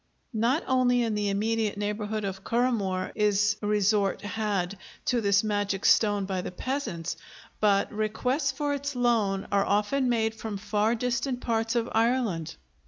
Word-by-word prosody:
Not 235 Hz, +8 st, +1 dB
only 250 Hz, -1 st, +3 dB
in 225 Hz, -2 st, -1 dB
the 210 Hz, -1 st, 0 dB
immediate 215 Hz, +1 st, 0 dB
neighborhood 210 Hz, +1 st, -2 dB
of 190 Hz, 0 st, -5 dB
Currahmore 220 Hz, -6 st, 0 dB
is 210 Hz, 0 st, +2 dB
resort 205 Hz, -1 st, +1 dB
had 205 Hz, -3 st, -2 dB, 0.3 s
to 245 Hz, -2 st, +1 dB
this 200 Hz, -1 st, +3 dB
magic 205 Hz, -2 st, -1 dB
stone 205 Hz, -2 st, +4 dB
by 190 Hz, -1 st, -2 dB
the -, -, -5 dB
peasants, 180 Hz, -, -4 dB, 0.4 s
but 200 Hz, -1 st, +2 dB
requests 250 Hz, +7 st, 0 dB
for 290 Hz, +1 st, -2 dB
its 285 Hz, 0 st, -3 dB
loan 220 Hz, -6 st, +1 dB
are 200 Hz, -1 st, +3 dB
often 210 Hz, +7 st, +1 dB
made 225 Hz, -2 st, +1 dB
from 220 Hz, -2 st, -5 dB
far 210 Hz, +3 st, +1 dB
distant 245 Hz, +2 st, -1 dB
parts 225 Hz, -1 st, -1 dB
of 235 Hz, -1 st, +1 dB
Ireland. 225 Hz, -8 st, 0 dB
215 Hz, 150 wpm, -27 LUFS, 200-240 Hz, 0.4 s, stone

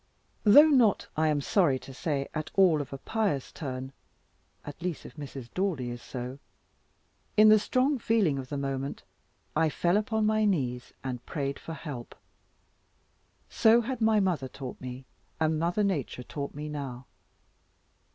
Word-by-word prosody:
Though 290 Hz, +9 st, +9 dB
not, 245 Hz, -8 st, +4 dB
I 155 Hz, 0 st, +2 dB
am 150 Hz, -2 st, +1 dB
sorry 150 Hz, -4 st, +3 dB
to 135 Hz, -, -11 dB
say, 140 Hz, 0 st, -2 dB
at 155 Hz, -1 st, -3 dB
all 180 Hz, -6 st, +5 dB
of 140 Hz, -, -8 dB
a 135 Hz, -, -5 dB
pious 200 Hz, -, -1 dB
turn 130 Hz, -2 st, -6 dB, 0.7 s
(at 145 Hz, +2 st, -9 dB
least 175 Hz, -2 st, -3 dB
if -, -, -11 dB
Mrs. 135 Hz, -5 st, -8 dB
Daldy 165 Hz, -11 st, -1 dB
is 120 Hz, 0 st, -7 dB
so), 125 Hz, +1 st, -6 dB, 1.0 s
in 215 Hz, 0 st, +8 dB
the 215 Hz, 0 st, +7 dB
strong 255 Hz, +5 st, +1 dB
feeling 205 Hz, -12 st, +2 dB
of 130 Hz, -1 st, -7 dB
the 145 Hz, -, -3 dB
moment, 135 Hz, 0 st, -3 dB, 0.5 s
I 160 Hz, -, +3 dB
fell 175 Hz, +5 st, +1 dB
upon 215 Hz, 0 st, 0 dB
my 215 Hz, 0 st, +2 dB
knees, 130 Hz, -12 st, 0 dB
and 125 Hz, -2 st, -4 dB
prayed 140 Hz, -2 st, -3 dB
for 165 Hz, -, -7 dB
help. 140 Hz, -8 st, -7 dB, 1.3 s
So 230 Hz, +1 st, +5 dB
had 250 Hz, +1 st, -4 dB
my 220 Hz, -1 st, +4 dB
mother 180 Hz, -9 st, 0 dB
taught 130 Hz, 0 st, -8 dB
me, 130 Hz, 0 st, -7 dB, 0.3 s
and 160 Hz, -1 st, +1 dB
Mother 175 Hz, +5 st, +1 dB
Nature 150 Hz, -, -2 dB
taught 140 Hz, +2 st, -6 dB
me 150 Hz, +1 st, -5 dB
now. 135 Hz, -4 st, -6 dB
150 Hz, 160 wpm, -29 LUFS, 135-205 Hz, 1.3 s, Though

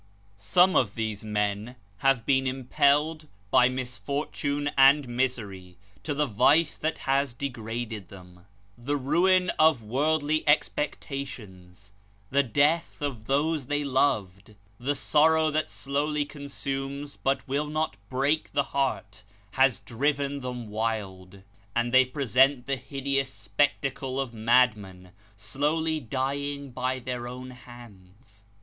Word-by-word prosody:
Some 105 Hz, -, +3 dB
of 105 Hz, -5 st, +2 dB
these 110 Hz, -2 st, -3 dB
men 105 Hz, +2 st, -2 dB, 0.2 s
have 135 Hz, -1 st, +2 dB
been 135 Hz, -1 st, +2 dB
impelled, 145 Hz, +4 st, +1 dB, 0.2 s
by 125 Hz, -1 st, +5 dB
misfortune 140 Hz, +3 st, -3 dB
and 140 Hz, +1 st, +6 dB
misery, 110 Hz, -8 st, -3 dB, 0.2 s
to 145 Hz, -, -3 dB
the 150 Hz, +1 st, +1 dB
vice 140 Hz, +7 st, +3 dB
that 160 Hz, +1 st, -2 dB
has 135 Hz, -2 st, +1 dB
degraded 115 Hz, -5 st, -5 dB
them. 90 Hz, -1 st, -15 dB, 0.3 s
The 135 Hz, +5 st, -2 dB
ruin 180 Hz, +7 st, +3 dB
of 155 Hz, -7 st, +4 dB
worldly 150 Hz, +6 st, 0 dB
expectations, 105 Hz, -11 st, -2 dB, 0.4 s
the 140 Hz, +1 st, +4 dB
death 145 Hz, +6 st, +1 dB
of 125 Hz, -7 st, -4 dB
those 145 Hz, +1 st, 0 dB
they 145 Hz, +1 st, 0 dB
loved, 105 Hz, -8 st, 0 dB, 0.2 s
the 140 Hz, +4 st, -1 dB
sorrow 155 Hz, +2 st, +3 dB
that 155 Hz, 0 st, 0 dB
slowly 145 Hz, +8 st, -2 dB
consumes, 140 Hz, 0 st, -5 dB
but 135 Hz, +1 st, -1 dB
will 140 Hz, +3 st, -1 dB
not 155 Hz, -4 st, -2 dB
break 140 Hz, +4 st, 0 dB
the 140 Hz, -1 st, +2 dB
heart, 120 Hz, -6 st, -2 dB, 0.3 s
has 135 Hz, 0 st, +3 dB
driven 140 Hz, +3 st, -1 dB
them 125 Hz, -4 st, -6 dB
wild; 100 Hz, -4 st, -4 dB, 0.3 s
and 120 Hz, +1 st, 0 dB
they 130 Hz, 0 st, +7 dB
present 130 Hz, 0 st, +2 dB
the 135 Hz, -, -1 dB
hideous 135 Hz, 0 st, -2 dB
spectacle 130 Hz, +6 st, -1 dB
of 130 Hz, -3 st, -3 dB
madmen, 110 Hz, -6 st, +1 dB, 0.3 s
slowly 150 Hz, +9 st, -1 dB
dying 140 Hz, +2 st, -3 dB
by 130 Hz, +1 st, -2 dB
their 125 Hz, -1 st, -5 dB
own 125 Hz, +1 st, -8 dB
hands. 105 Hz, -5 st, -15 dB
130 Hz, 120 wpm, -27 LUFS, 110-145 Hz, 0.4 s, they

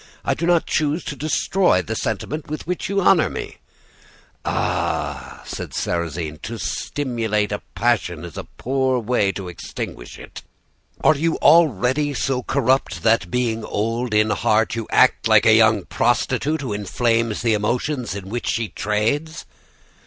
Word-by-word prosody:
I -, -, +2 dB
do 170 Hz, -, -2 dB
not 175 Hz, -2 st, +3 dB
choose 155 Hz, +2 st, 0 dB
to 145 Hz, -, -5 dB
destroy 155 Hz, -, +1 dB
the 110 Hz, -, -4 dB
sentiment 125 Hz, +9 st, -3 dB
with 155 Hz, -, -5 dB
which 180 Hz, +2 st, -3 dB
you 200 Hz, 0 st, +1 dB
honor 180 Hz, -2 st, +4 dB
me.' -, -, -6 dB, 0.9 s
"'Ah!' -, -, -2 dB
said -, -, -6 dB
Sarrasine, 80 Hz, -3 st, -3 dB
'to 115 Hz, +2 st, -6 dB
stimulate 115 Hz, -7 st, -2 dB
a 105 Hz, -, -3 dB
passion 95 Hz, -8 st, 0 dB
is 85 Hz, -, -10 dB
a -, -, -6 dB
poor 130 Hz, 0 st, 0 dB
way 110 Hz, -4 st, +1 dB
to 95 Hz, -2 st, -6 dB
extinguish 85 Hz, -7 st, -7 dB
it! -, -, -10 dB, 0.6 s
Are 155 Hz, -, +6 dB
you 160 Hz, +3 st, 0 dB
already 145 Hz, -, +3 dB
so 130 Hz, -1 st, 0 dB
corrupt 135 Hz, +1 st, 0 dB
that, 115 Hz, +1 st, +3 dB
being 120 Hz, -3 st, -1 dB
old 115 Hz, +2 st, -2 dB
in 105 Hz, 0 st, +3 dB
heart, 110 Hz, +2 st, +2 dB
you 115 Hz, -1 st, -4 dB
act -, -, +4 dB
like -, -, +5 dB
a -, -, +7 dB
young -, -, +4 dB
prostitute 155 Hz, +2 st, 0 dB
who 130 Hz, -6 st, -3 dB
inflames 115 Hz, +2 st, 0 dB
the 115 Hz, -2 st, +3 dB
emotions 120 Hz, +2 st, -1 dB
in 100 Hz, -2 st, -7 dB
which 120 Hz, +3 st, -4 dB
she 115 Hz, -2 st, -1 dB
trades? 115 Hz, +10 st, -1 dB
120 Hz, 155 wpm, -21 LUFS, 105-145 Hz, 0.9 s, a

